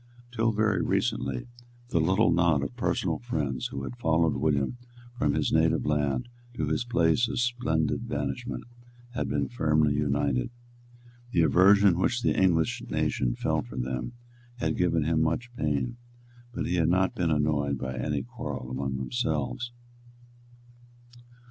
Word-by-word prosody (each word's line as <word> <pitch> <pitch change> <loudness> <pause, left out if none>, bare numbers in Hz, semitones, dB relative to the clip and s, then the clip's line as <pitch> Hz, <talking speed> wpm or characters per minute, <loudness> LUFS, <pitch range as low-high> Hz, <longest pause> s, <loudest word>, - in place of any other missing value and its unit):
Till 115 -1 +1
very 110 -2 +1
recently, 65 -2 -1 0.4
the 85 - +1
little 95 +7 +3
knot 85 -4 +3
of 65 -4 -5
personal - - -1
friends 75 - -2
who 70 - -6
had 120 - -6
followed 80 -5 +2
William 75 - 0 0.4
from 75 -11 +1
his - - 0
native 80 0 +3
land 75 - 0 0.3
to - - -1
his 120 - 0
place 115 -1 +2
of 140 - -2
splendid 120 - 0
banishment 70 -2 -3 0.5
had 120 - -3
been - - 0
firmly 75 -9 +2
united. 70 - 0 0.8
The 85 - +4
aversion 95 +4 +5
which 120 +5 +1
the - - +2
English 85 -4 +2
nation - - 0
felt - - -1
for 65 - -9
them 65 - -3 0.4
had 120 - -1
given 85 -3 +1
him 80 +1 +1
much 120 +10 -1
pain; 75 - -1 0.5
but - - -3
he 90 - 0
had 80 -1 +3
not 95 +1 +2
been 85 -2 0
annoyed 75 -2 +1
by 65 0 -4
any 70 +2 -2
quarrel 65 +1 -6
among 65 0 -2
themselves. 120 - -2
80 Hz, 145 wpm, -28 LUFS, 70-105 Hz, 0.8 s, aversion